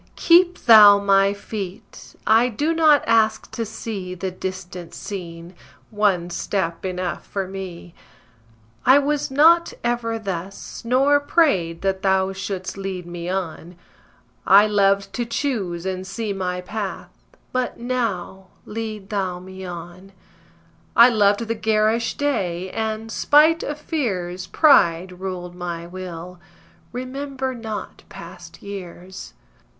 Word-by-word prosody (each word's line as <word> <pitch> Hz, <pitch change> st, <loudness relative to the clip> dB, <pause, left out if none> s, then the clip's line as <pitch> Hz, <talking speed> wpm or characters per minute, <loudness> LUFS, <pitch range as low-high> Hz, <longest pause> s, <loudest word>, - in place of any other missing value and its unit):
Keep 350 Hz, +1 st, +4 dB
Thou 210 Hz, -4 st, +9 dB
my 195 Hz, 0 st, +3 dB
feet; 200 Hz, 0 st, -8 dB
I 225 Hz, +3 st, +4 dB
do 295 Hz, +8 st, -1 dB
not 310 Hz, -3 st, +5 dB
ask 220 Hz, -1 st, +2 dB
to 230 Hz, -, -3 dB
see 205 Hz, -4 st, -6 dB
The 185 Hz, +1 st, -4 dB
distant 185 Hz, -1 st, -7 dB
scene; 170 Hz, -3 st, -7 dB, 0.4 s
one 195 Hz, -5 st, +1 dB
step 170 Hz, -2 st, -2 dB
enough 185 Hz, -1 st, -3 dB
for 195 Hz, -2 st, -3 dB
me. 185 Hz, -3 st, -8 dB, 0.9 s
I 260 Hz, +2 st, +6 dB
was 285 Hz, +1 st, 0 dB
not 325 Hz, +5 st, +4 dB
ever 240 Hz, -1 st, -1 dB
thus, 195 Hz, -2 st, -6 dB
nor 270 Hz, +4 st, +3 dB
prayed 195 Hz, -, +1 dB
that 190 Hz, -1 st, 0 dB
Thou 190 Hz, -1 st, +1 dB
Shouldst 190 Hz, -1 st, -5 dB
lead 190 Hz, -2 st, -5 dB
me 175 Hz, 0 st, -6 dB
on; 180 Hz, -2 st, -4 dB, 0.7 s
I 200 Hz, +2 st, +8 dB
loved 200 Hz, -1 st, +2 dB
to 245 Hz, -, -1 dB
choose 220 Hz, -8 st, -3 dB
and 190 Hz, 0 st, -4 dB
see 205 Hz, +1 st, -3 dB
my 180 Hz, -2 st, -3 dB
path; 205 Hz, +1 st, -5 dB, 0.4 s
but 255 Hz, -1 st, -1 dB
now 220 Hz, -6 st, -3 dB, 0.2 s
Lead 215 Hz, -2 st, -6 dB
Thou 190 Hz, -3 st, -1 dB
me 190 Hz, +1 st, -10 dB
on. 175 Hz, +2 st, -9 dB, 0.8 s
I 235 Hz, +2 st, +8 dB
loved 205 Hz, -2 st, +3 dB
the 230 Hz, 0 st, -2 dB
garish 220 Hz, +1 st, +1 dB
day; 185 Hz, -11 st, -1 dB
and, 220 Hz, 0 st, -3 dB
spite 310 Hz, +6 st, +4 dB
of 295 Hz, -, -4 dB
fears, 185 Hz, -, -3 dB
Pride 180 Hz, -, +3 dB
ruled 180 Hz, -2 st, -5 dB
my 175 Hz, -1 st, -5 dB
will: 180 Hz, 0 st, -8 dB, 0.5 s
remember 265 Hz, +1 st, -4 dB
not 220 Hz, -3 st, -7 dB
past -, -, -12 dB
years. 185 Hz, -, -9 dB
195 Hz, 125 wpm, -22 LUFS, 180-230 Hz, 0.9 s, Thou